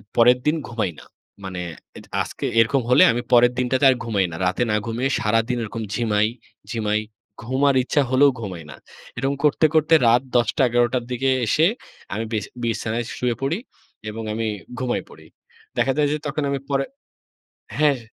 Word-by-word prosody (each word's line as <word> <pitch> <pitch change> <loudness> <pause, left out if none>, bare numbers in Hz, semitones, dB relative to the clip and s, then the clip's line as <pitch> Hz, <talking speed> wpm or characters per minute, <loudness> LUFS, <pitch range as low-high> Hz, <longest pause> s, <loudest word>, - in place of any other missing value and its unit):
পরের 120 +1 +6
দিন 150 +2 +3
ঘুমাই 110 -6 -1
না। - - -14 0.4
মানে 95 -2 -5 0.4
এজ - - -12 0.2
আজকে - - -5
এরকম 120 +4 +3
হলে 125 - +7
আমি 120 +1 -1
পরের 120 0 +6
দিনটাতে 130 +2 +1
আর 130 - +4
ঘুমাই 105 -5 +1
না। - - -6
রাতে 95 +6 +1
না 105 - +2
ঘুমিয়ে 120 +4 -1
সারাদিন 115 +3 +1
এরকম 110 +1 -5
ঝিমাই, 105 -1 +1 0.4
ঝিমাই, 110 -2 0 0.4
ঘুম 130 +4 -2
আর 140 - +2
ইচ্ছা 145 +3 +1
হলেও 135 +2 +5
ঘুমাই 95 -7 -6
না। - - -9 0.4
এরকম 135 +3 0
করতে, 150 +1 +3
করতে 155 +1 +3
রাত 120 +2 +5
১০:০০-১১:০০ 120 0 +3
টার 125 -2 0
দিকে 130 +2 0 0.2
এসে 155 +8 +3 0.5
আমি 110 - -2
বিছা 110 -2 -2
বিছানায় 115 0 -2
শুয়ে 125 -1 0
পড়ি 140 +6 0 0.5
এবং 110 +1 -6
আমি 110 +1 -2 0.3
ঘুমাই 125 -1 -1
পড়ি। - - -15 0.5
দেখা 135 - +2
যায় 150 -1 +3
যে - - 0
তখন 150 +1 -2
আমি 140 0 -1
পরে 135 -1 +1 1.0
হ্যাঁ। 145 -3 +3
120 Hz, 170 wpm, -22 LUFS, 110-135 Hz, 1.0 s, হলে